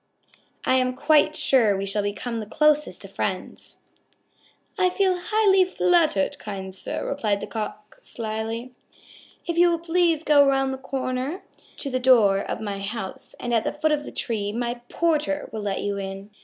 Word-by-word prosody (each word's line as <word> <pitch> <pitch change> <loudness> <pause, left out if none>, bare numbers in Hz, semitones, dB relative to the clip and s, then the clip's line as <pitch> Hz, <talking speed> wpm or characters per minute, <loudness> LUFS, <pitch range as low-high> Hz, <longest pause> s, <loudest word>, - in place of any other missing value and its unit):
I 260 - +4
am 255 0 +1
quite 305 +3 +3
sure 225 -7 +3
we 195 - -2
shall 200 +1 0
become 225 +3 -3
the 215 - -6
closest 300 +4 +1
of - - -12
friends." - - -4 1.0
"I 370 -2 +3
feel 375 0 +2
highly 390 +1 +3
flattered, 345 - +2
kind 190 -2 -6
sir," 185 - -5
replied 215 -8 0
the - - -5
Cock 215 -1 -6
slyly. 225 +2 -5 0.7
"If 340 0 -1
you 350 0 +6
will 340 - +1
please 335 -1 +1
go 295 -2 +6
around 270 -1 +2
to 265 +3 -5
the 255 - 0
door 230 -6 +5
of 200 - -4
my 205 -2 -4
house 195 -1 -6
at 235 -2 0
the - - -2
foot 310 +1 0
of 295 -1 0
the - - -8
tree, 205 -4 -2
my 240 +2 -3
porter 300 -3 0
will 220 - -4
let 200 -1 -2
you 200 0 -2
in." 195 +1 -7
255 Hz, 165 wpm, -24 LUFS, 210-305 Hz, 1.0 s, you